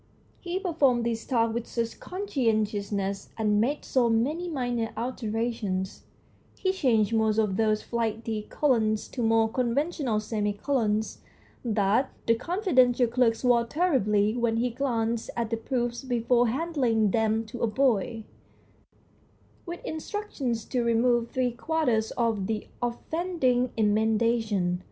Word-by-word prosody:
He 355 Hz, +1 st, -3 dB
performed 285 Hz, -11 st, +2 dB
this 230 Hz, -1 st, -2 dB
task 230 Hz, -3 st, +2 dB
with 235 Hz, 0 st, -3 dB
such 230 Hz, -1 st, -3 dB
conscientiousness, 215 Hz, -, -1 dB
and 210 Hz, -2 st, +2 dB
made 280 Hz, +6 st, -1 dB
so 245 Hz, -3 st, +2 dB
many 295 Hz, +11 st, 0 dB
minor 245 Hz, -6 st, -2 dB
alterations 225 Hz, -5 st, -3 dB, 0.5 s
he 375 Hz, -, +1 dB
changed 230 Hz, -, +2 dB
most 220 Hz, -1 st, +2 dB
of 210 Hz, -4 st, +1 dB
those 215 Hz, 0 st, +1 dB
flighty 225 Hz, -2 st, -2 dB
colons 220 Hz, -7 st, +1 dB
to 250 Hz, -, -5 dB
more 225 Hz, -1 st, +3 dB
conventional 255 Hz, +1 st, 0 dB
semicolons 215 Hz, +1 st, -1 dB, 0.4 s
that 220 Hz, +2 st, +2 dB, 0.2 s
the 230 Hz, -, +4 dB
confidential 255 Hz, -, +2 dB
clerk 235 Hz, -1 st, +2 dB
swore 240 Hz, 0 st, +3 dB
terribly 230 Hz, -, +1 dB
when 235 Hz, -2 st, +1 dB
he 245 Hz, +1 st, 0 dB
glanced 230 Hz, -3 st, -1 dB
at 230 Hz, -1 st, -1 dB
the 230 Hz, -, 0 dB
proofs 240 Hz, +1 st, -2 dB
before 245 Hz, -1 st, +2 dB
handing 245 Hz, -, +1 dB
them 225 Hz, +1 st, +1 dB
to 225 Hz, +2 st, -8 dB
a 235 Hz, -, +2 dB
boy, 225 Hz, -2 st, +1 dB, 1.4 s
with 345 Hz, 0 st, -7 dB
instructions 310 Hz, -, -3 dB
to 250 Hz, -, -1 dB
remove 235 Hz, 0 st, +2 dB
three 255 Hz, -1 st, 0 dB
quarters 240 Hz, -4 st, 0 dB
of 225 Hz, -5 st, 0 dB
the 220 Hz, -1 st, -2 dB, 0.2 s
offending 255 Hz, 0 st, 0 dB
emendations. 215 Hz, -3 st, +1 dB
235 Hz, 125 wpm, -27 LUFS, 220-255 Hz, 1.4 s, the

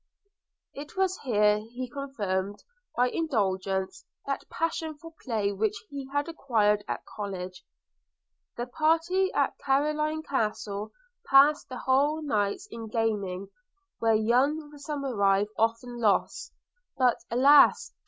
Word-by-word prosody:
It 290 Hz, +5 st, -9 dB
was 380 Hz, -1 st, +1 dB
here 210 Hz, -4 st, +3 dB
he 240 Hz, +4 st, -7 dB
confirmed, 205 Hz, -8 st, -3 dB, 0.3 s
by 250 Hz, +1 st, +3 dB
indulgence, 190 Hz, -, -1 dB, 0.2 s
that 275 Hz, 0 st, -4 dB
passion 320 Hz, -2 st, -2 dB
for 330 Hz, +2 st, -12 dB
play 215 Hz, -5 st, 0 dB
which 210 Hz, +1 st, -1 dB, 0.2 s
he 280 Hz, -2 st, -6 dB
had 285 Hz, +2 st, 0 dB
acquired 220 Hz, -10 st, +1 dB
at -, -, -4 dB
college. 185 Hz, -3 st, -6 dB, 0.9 s
The 240 Hz, -, -2 dB
party 330 Hz, +8 st, +1 dB
at -, -, 0 dB
Carloraine 305 Hz, +3 st, 0 dB
Castle 210 Hz, -6 st, -2 dB, 0.4 s
passed 280 Hz, +1 st, +5 dB
whole 280 Hz, +5 st, +1 dB
nights 215 Hz, -, -1 dB
in 225 Hz, -1 st, -7 dB
gaming, 205 Hz, -4 st, -2 dB, 0.5 s
where 225 Hz, -1 st, +3 dB
young 270 Hz, +8 st, +1 dB
Somerive 240 Hz, -9 st, 0 dB
often 230 Hz, +2 st, -1 dB
lost, 215 Hz, -3 st, +1 dB, 0.5 s
but 250 Hz, -2 st, +3 dB
alas! 275 Hz, +5 st, +5 dB
245 Hz, 115 wpm, -28 LUFS, 210-290 Hz, 0.9 s, passed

